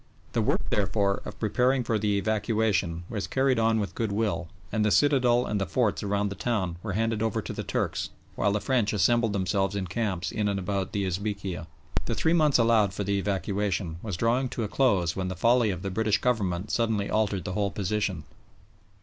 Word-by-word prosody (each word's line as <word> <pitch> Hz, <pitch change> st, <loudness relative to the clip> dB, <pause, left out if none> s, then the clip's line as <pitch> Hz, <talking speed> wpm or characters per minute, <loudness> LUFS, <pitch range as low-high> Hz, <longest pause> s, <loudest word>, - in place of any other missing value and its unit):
The -, -, +2 dB
work, -, -, 0 dB
therefore, 100 Hz, 0 st, +1 dB
of -, -, -8 dB
preparing 125 Hz, +4 st, +2 dB
for 115 Hz, -2 st, 0 dB
the 105 Hz, -1 st, +1 dB
evacuation 105 Hz, -5 st, 0 dB
was 105 Hz, -3 st, -4 dB
carried 130 Hz, -2 st, +2 dB
on 115 Hz, 0 st, +3 dB
with 100 Hz, -, -3 dB
goodwill, 105 Hz, -5 st, -1 dB, 0.2 s
and 110 Hz, -1 st, +1 dB
the 105 Hz, -, +3 dB
citadel 125 Hz, -2 st, +3 dB
and 105 Hz, -1 st, -1 dB
the 100 Hz, -, -1 dB
forts 110 Hz, +4 st, +1 dB
around 100 Hz, 0 st, 0 dB
the 100 Hz, -, -6 dB
town 95 Hz, -6 st, -1 dB
were 105 Hz, -3 st, -4 dB
handed 115 Hz, +1 st, 0 dB
over 110 Hz, -2 st, 0 dB
to -, -, -5 dB
the -, -, -4 dB
Turks, -, -, -2 dB, 0.2 s
while 100 Hz, -, +1 dB
the 105 Hz, -, +1 dB
French 120 Hz, -3 st, +1 dB
assembled 115 Hz, +3 st, +3 dB
themselves 95 Hz, 0 st, 0 dB
in 100 Hz, -2 st, -1 dB
camps 95 Hz, -1 st, -2 dB
in 105 Hz, -1 st, -1 dB
and 100 Hz, -1 st, 0 dB
about 95 Hz, 0 st, -2 dB
the 100 Hz, -1 st, 0 dB
Esbekieh. 95 Hz, -2 st, -3 dB, 0.4 s
The -, -, -2 dB
three 160 Hz, -, +2 dB
months 155 Hz, -4 st, +4 dB
allowed 115 Hz, -5 st, +3 dB
for 100 Hz, -, -2 dB
the 100 Hz, 0 st, 0 dB
evacuation 95 Hz, -3 st, -1 dB
was 100 Hz, -6 st, -4 dB
drawing 120 Hz, +5 st, +1 dB
to 115 Hz, -, -3 dB
a -, -, -1 dB
close 100 Hz, -9 st, +2 dB
when 95 Hz, -1 st, -2 dB
the 95 Hz, -, -4 dB
folly 115 Hz, +4 st, +3 dB
of 90 Hz, -2 st, -3 dB
the 95 Hz, -, -3 dB
British 110 Hz, +1 st, +2 dB
Government 100 Hz, -6 st, 0 dB
suddenly 110 Hz, -4 st, +1 dB
altered 100 Hz, -4 st, 0 dB
the 95 Hz, -, -4 dB
whole 100 Hz, 0 st, 0 dB
position. 100 Hz, -4 st, -2 dB
105 Hz, 200 wpm, -27 LUFS, 95-115 Hz, 0.4 s, months